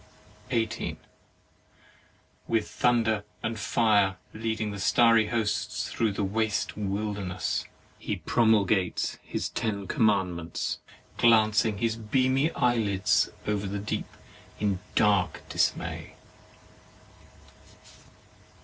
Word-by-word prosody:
18. 115 0 -1 1.5
With 110 -2 +1
thunder 115 -3 +1 0.2
and 110 0 -2
fire, 105 -3 +2 0.2
leading 110 -1 -2
his 100 -1 -4
starry 115 -2 +5
hosts 110 -3 -1
through 115 -2 +1
the 100 +1 -2
waste 110 +2 -1
wilderness, 100 -2 -2 0.3
he - - -3
promulgates 105 -5 +1
his - - -3
ten 100 -3 -2
commandments, 95 - 0 0.4
glancing 110 -2 +4
his 115 +1 0
beamy 130 +6 +1
eyelids 115 -7 +2 0.2
over 105 -1 -1
the 100 +1 -3
deep 100 +1 -3 0.5
in 100 -3 0 0.2
dark 100 -5 +2
dismay. - - -1
105 Hz, 90 wpm, -27 LUFS, 100-115 Hz, 1.5 s, starry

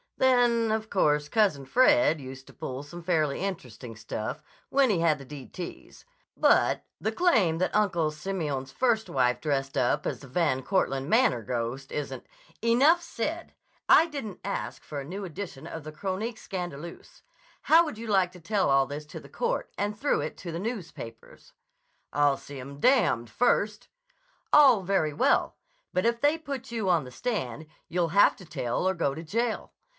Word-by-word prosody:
Then, 240 -3 +3
of 220 0 -2
course, 150 -5 +2
Cousin 195 -11 +2
Fred 255 - +4
used 130 0 -9
to - - -14
pull 130 +1 -5
some 170 +4 -10
fairly 155 -5 +1
interesting 125 - -5
stuff 110 +6 -5 0.3
when 270 -2 +3
he 195 -5 +2
had 165 -2 +3
the 140 - -10
d 140 -1 -9
t's, 175 -2 -9 0.3
but - - +3 0.2
the - - -1
claim 220 - +2
that 185 - 0
Uncle 175 -7 +2
Simeon's 150 -5 -4
first 235 - +1
wife 125 -2 +1
dressed 135 -3 -1
up 120 - +1
as - - -3
the 140 - -12
Van 130 -1 0
Cortland 135 -6 0
Manor 225 - +3
ghost 125 +4 -4
isn't—" 150 -1 -4 0.4
"Enough 275 +9 +5
said! 330 +2 -4 0.3
I 330 - +7
didn't 275 - -6
ask 200 +1 -4
for 145 - -6
a 135 - -6
new 190 +7 -6
edition 175 -5 -7
of 160 - -7
the 155 - -7
Chronique 200 +7 -4
Scandaleuse. 175 - -7 0.4
How 330 +2 +6
would 300 -8 -6
you 230 +1 -7
like 190 -4 +2
to 180 - -13
tell 195 +2 0
all 135 0 +4
this 145 +2 -6
to - - -8
the - - -14
court, 485 +1 -2
and 205 +1 -2
through 285 +6 +1
it - - -5
to 175 - -7
the 165 - -4
newspapers?" 175 - -7 0.6
"I'll 145 -2 +3
see 140 -1 -10
'em 140 +2 -9
d— 255 - +5
d 120 0 -1
first!" 210 - +1 0.6
"All 270 -8 +7
very 180 -5 0
well. 145 - +2 0.4
But 185 - +1
if 235 0 0
they 295 +3 +3
put 270 -5 -6
you 220 -5 -1
on 170 -4 +3
the 125 - -10
stand, 155 - -3 0.2
you'll 175 -1 0
have 200 +5 +5
to 185 - -12
tell 140 +1 -2
or 190 - +1
go 155 -5 0
to 160 +4 -7
jail. 225 +7 -2
175 Hz, 180 wpm, -27 LUFS, 140-225 Hz, 0.6 s, I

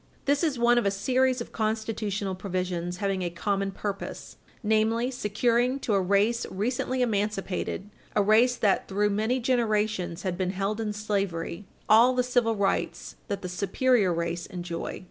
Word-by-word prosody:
This 285 +3 +2
is 300 -6 +1
one 240 0 +4
of 240 - -2
a - - +5
series 255 +5 +1
of - - -7
constitutional 215 -3 -2
provisions 180 -2 -3
having 195 -1 -1
a 175 - -1
common 195 +3 -1
purpose 200 0 -6 0.3
namely, 220 +3 +2
securing 240 +2 +1
to 220 - 0
a 195 - +3
race 200 +5 +2
recently 250 +5 -1
emancipated, 205 -3 -2 0.3
a 205 - +4
race 225 +5 +4
that, 205 -5 +1
through 205 +1 +1
many 220 +5 +1
generations, 215 -8 0
had 185 -2 -2
been 185 -1 0
held 205 +3 -1
in 215 -1 -1
slavery, 200 -3 -2 0.2
all 235 +4 +6
the 250 - +2
civil 245 -2 +1
rights 200 -1 -1
that 200 -3 -4
the - - -2
superior 200 +3 +2
race 170 0 -2
enjoy. 175 -2 -5
210 Hz, 160 wpm, -27 LUFS, 195-235 Hz, 0.3 s, all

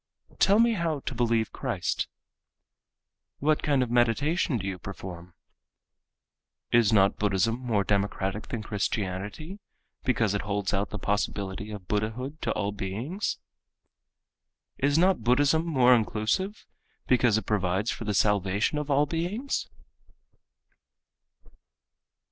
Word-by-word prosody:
Tell 200 +2 +5
me 230 +1 +4
how 165 -7 -1
to - - -4
believe 115 -2 0
Christ. - - -2 1.3
What 155 +2 +2
work 140 -3 +3
of 120 - -5
meditation 125 - +2
do 95 - -5
you 95 -2 -4
perform? 90 0 -9 1.4
Is 115 -2 +4
not 100 -2 +4
Buddhism 105 +3 +1
more 115 -6 0
democratic 100 0 -1
than 115 -3 -4
Christianity, 105 - -3 0.4
because 115 -5 +1
it 100 - 0
holds 100 -1 -2
out 100 +1 0
the 105 - -5
possibility 100 -1 -2
of 100 -4 -8
Buddhahood 115 - -2
to 115 - -1
all 100 - -1
beings? 105 - -3 1.4
Is 140 +2 +2
not 185 -1 +3
Buddhism 145 +7 +3
more 130 -6 +5
inclusive, 115 - 0 0.4
because 120 -4 +4
it 110 - -3
provides 100 +1 0
for 115 - -6
the 105 -1 -1
salvation 105 +7 +2
of 150 0 -5
all 145 +1 +4
beings? 175 - -2
115 Hz, 120 wpm, -27 LUFS, 100-145 Hz, 1.4 s, Tell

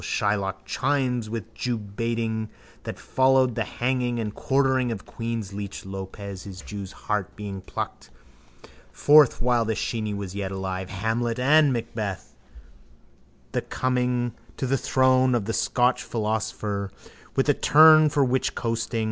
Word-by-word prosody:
Shylock 100 -2 -1
chimes 130 -5 0
with 115 0 -6
the - - -23
jewbaiting 115 -1 -2 0.4
that - - -5
followed 130 -1 +3
the - - -1
hanging 125 -1 -1
and 105 -2 -3
quartering 130 -2 +1
of 115 - -2
the - - -18
queen's 115 -4 -4
leech 100 -1 -6
Lopez, 95 0 -7
his 95 -2 -9
jew's 100 -2 -7
heart 105 -3 -3
being 100 -2 -6
plucked - - -6 0.8
forth 145 -4 +5
while 120 -1 +3
the 110 0 -1
sheeny 110 -2 -2
was 100 -2 -5
yet 100 -1 -3
alive: 95 -1 -4
Hamlet 115 +4 -1
and 145 +3 +5
Macbeth 110 -5 -4 1.1
with - - -33
the - - -1
coming 125 -1 -1 0.2
to - - -2
the 135 +1 +1
throne 130 -1 +3
of 110 -4 -1
a 115 - -1
Scotch 125 +2 +2
philosophaster 105 -2 -2 0.5
with 135 - +2
a 145 - +5
turn 155 +2 +7
for 145 -1 +2
witchroasting. 115 -2 -1
115 Hz, 145 wpm, -25 LUFS, 100-130 Hz, 1.1 s, turn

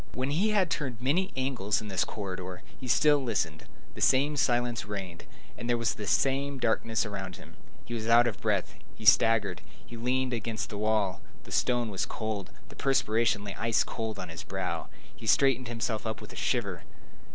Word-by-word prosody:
When 130 +2 -1
he 185 +9 +2
had 195 -5 +2
turned 130 -8 -2
many 160 +10 +1
angles 120 -6 0
in 110 - -7
this 95 -3 +1
corridor, 95 -3 -5
he 130 - -8
still 145 +4 +4
listened. 85 -10 -1 0.3
The - - -9
same 140 +3 +4
silence 120 -3 +1
reigned, 95 -5 -6 0.3
and 120 - -6
there 120 - +3
was 115 -2 +1
the 105 - -6
same 135 +6 +1
darkness 115 -1 +1
around 95 -3 -5
him. - - -13 0.3
He 120 - -6
was 110 -1 -3
out 120 +1 +7
of 115 -4 -2
breath; - - 0 0.2
he 110 - -10
staggered; 115 0 +5 0.2
he 120 - -9
leaned 125 +2 0
against 110 -2 -3
the 105 - -4
wall. 105 -3 +1 0.2
The - - -13
stone 120 -3 +1
was 95 - -1
cold; 110 -4 -4 0.2
the - - -13
perspiration 115 -5 +2
lay 100 -1 -5
ice 115 0 +3
cold 110 -2 -4
on 90 - -6
his 85 - -6
brow; - - -3 0.3
he 110 - -9
straightened 130 0 +4
himself 115 -1 -2
up 110 -2 -3
with - - -10
a - - -12
shiver. - - -1
115 Hz, 190 wpm, -29 LUFS, 105-130 Hz, 0.3 s, out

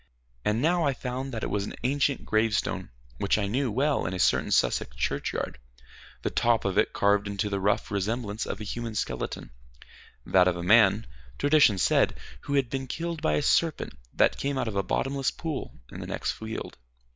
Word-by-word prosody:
And 110 +4 +1
now 175 +2 +3
I 140 -3 +1
found 130 +1 -4
that 115 -3 -4
it - - -2
was 100 -1 0
an - - -6
ancient 140 +1 +1
gravestone 110 -1 0 0.3
which 100 - +2
I 105 - 0
knew 125 +4 0
well 135 - +1
in 90 - -3
a - - -3
certain 90 - +2
Sussex - - +1
churchyard, - - -2 0.6
the - - -1
top 120 -2 +2
of 95 -1 0
it 105 - +3
carved 100 0 +2
into 100 +1 -2
the 100 - 0
rough 100 +1 0
resemblance 105 +2 -2
of - - -4
a - - -5
human 115 +1 -4
skeleton 80 - -3 0.7
that 90 -1 +4
of 90 - +2
a 85 - -4
man, 105 +2 +5 0.3
tradition 145 -8 +5
said, 90 - +3 0.3
who 140 0 -1
had 135 -2 +2
been 135 -1 -3
killed 165 +2 -4
by 160 - +1
a 145 - +1
serpent 165 +2 +1 0.2
that - - +3
came 140 0 -1
out 130 - -1
of 110 - -3
a 100 - +2
bottomless 135 +6 0
pool 160 -5 -5
in - - -8
the - - -6
next - - -2
field. 110 0 -6
115 Hz, 195 wpm, -27 LUFS, 100-135 Hz, 0.7 s, man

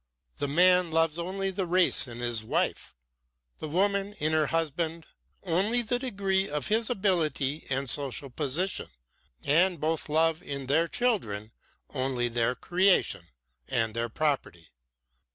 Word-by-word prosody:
The 145 - -1
man 180 +4 +4
loves 165 0 +1
only 190 +2 -3
the 190 -1 -3
race 180 -4 +4
in 120 0 -8
his 120 -2 0
wife, 110 - -2 0.6
the - - -5
woman 200 +4 0
in 155 -6 -1
her 155 -1 +2
husband 165 +1 -1 0.4
only 200 +7 +1
the 245 +2 -1
degree 195 -6 -1
of 150 +1 -3
his 220 +1 +2
ability 160 - 0
and 135 +1 -1
social 140 0 0
position, 155 +8 -1 0.6
and 175 +3 +3
both 160 +1 -2
love 160 +1 +2
in 140 -1 -6
their 155 +6 +2
children 115 - -1 0.4
only 130 -3 -1
their 120 +1 0
creation 180 - +1 0.4
and 115 -2 -1
their 115 +1 -2
property. 120 - -2
160 Hz, 135 wpm, -28 LUFS, 135-190 Hz, 0.6 s, man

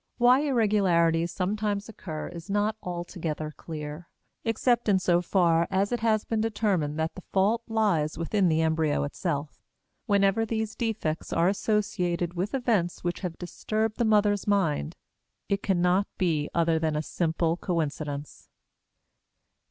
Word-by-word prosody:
Why 245 +2 +6
irregularities 190 - +2
sometimes 205 +2 -1
occur 165 -8 -6
is 170 +1 -10
not 205 +2 +1
altogether 175 -3 -4
clear; 155 +1 -7 0.3
except 235 +1 +1
in 195 - +5
so 175 -1 +2
far 170 -2 +2
as 195 +2 +1
it 240 - 0
has 220 -1 +1
been 225 -1 -1
determined 200 -9 0
that 160 0 -1
the 190 - -10
fault 205 +5 +2
lies 195 -10 +1
within 180 +3 +1
the 160 0 +2
embryo 160 -2 +1
itself. 145 +1 -3 0.5
Whenever 200 +1 +3
these 220 -1 -2
defects 215 -9 -2
are 170 +2 +3
associated 185 -4 0
with 185 +7 -2
events 220 -9 0
which 175 0 -2
have 180 -4 -5
disturbed 215 +4 -2
the - - +3
mother's 210 -2 +2
mind, 165 - +1 0.5
it 200 0 0
cannot 185 0 +2
be 160 -5 0
other 165 -1 +2
than 160 -1 0
a 150 - -1
simple 165 0 0
coincidence. 150 -4 -4
180 Hz, 140 wpm, -27 LUFS, 165-210 Hz, 0.5 s, Why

